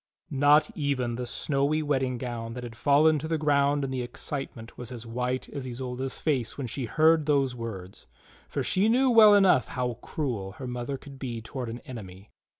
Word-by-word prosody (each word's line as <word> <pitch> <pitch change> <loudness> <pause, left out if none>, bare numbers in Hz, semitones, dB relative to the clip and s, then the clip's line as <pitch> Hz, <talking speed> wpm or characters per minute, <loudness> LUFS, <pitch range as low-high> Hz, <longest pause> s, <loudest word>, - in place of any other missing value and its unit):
Not 145 +2 +4
even 135 -5 -1
the 125 +1 -4
snowy 140 +4 0
wedding 135 -4 0
gown 115 -2 -5
that 125 - -6
had 120 -2 -8
fallen 150 +5 +4
to 155 - -5
the 160 0 0
ground 145 -1 +2
in 135 - -3
the 130 -1 -2
excitement 120 -1 -6
was 125 0 -7
as 120 -2 -7
white 125 +2 -2
as 135 -3 -6
Isolda's 130 +1 -4
face 135 -7 -1
when 140 - -3
she 125 +2 -3
heard 155 +5 +3
those 135 -4 +2
words, 100 -6 -7 0.4
for - - -2
she 200 +4 +2
knew 255 +2 +4
well 215 -3 +8
enough 190 -10 +5
how 125 -3 -3
cruel 115 -11 -3
her 130 - -8
mother 125 +2 -4
could 140 -1 -13
be 120 -4 -4
toward 125 +1 -6
an 120 +2 -7
enemy. 100 -5 -10
130 Hz, 190 wpm, -27 LUFS, 120-145 Hz, 0.4 s, well